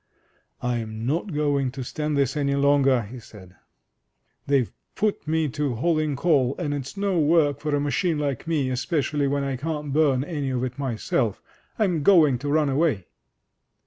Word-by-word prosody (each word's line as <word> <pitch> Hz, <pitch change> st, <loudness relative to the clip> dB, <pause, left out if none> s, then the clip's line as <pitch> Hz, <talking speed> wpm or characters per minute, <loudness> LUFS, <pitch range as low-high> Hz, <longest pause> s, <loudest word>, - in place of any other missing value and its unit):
"Fm 115 Hz, -3 st, -3 dB
not 160 Hz, -, -1 dB
going 145 Hz, -3 st, +1 dB
to 135 Hz, -1 st, -5 dB
stand 150 Hz, +3 st, -2 dB
this 140 Hz, -1 st, +1 dB
any 140 Hz, -1 st, 0 dB
longer!'* 140 Hz, -3 st, +3 dB
he 120 Hz, +5 st, -9 dB
said. 95 Hz, -5 st, -14 dB, 0.9 s
"They've 135 Hz, -4 st, +2 dB, 0.2 s
put 205 Hz, -5 st, -1 dB
me 160 Hz, 0 st, +1 dB
to 145 Hz, -2 st, -2 dB
hauling 155 Hz, +2 st, 0 dB
coal, 140 Hz, -4 st, +2 dB
and 150 Hz, -5 st, -2 dB
it's 140 Hz, +5 st, -5 dB
no 195 Hz, -3 st, +1 dB
work 150 Hz, -2 st, +3 dB
for 150 Hz, -1 st, -1 dB
a -, -, +1 dB
machine 150 Hz, +3 st, 0 dB
like 145 Hz, -1 st, -3 dB
me, 150 Hz, -5 st, 0 dB
espe 130 Hz, +7 st, -1 dB
cially 145 Hz, 0 st, 0 dB
when 140 Hz, 0 st, 0 dB
I 135 Hz, -2 st, -2 dB
can't 150 Hz, 0 st, -4 dB
burn 140 Hz, -4 st, +3 dB
any 145 Hz, -4 st, -3 dB
of 125 Hz, -1 st, -1 dB
it 130 Hz, +2 st, -4 dB
myself. 120 Hz, -4 st, -1 dB, 0.4 s
I'm 180 Hz, -8 st, +1 dB
going 150 Hz, -8 st, +5 dB
to 145 Hz, +3 st, -4 dB
run 150 Hz, -1 st, +2 dB
away 135 Hz, -, 0 dB
145 Hz, 175 wpm, -24 LUFS, 130-155 Hz, 0.9 s, going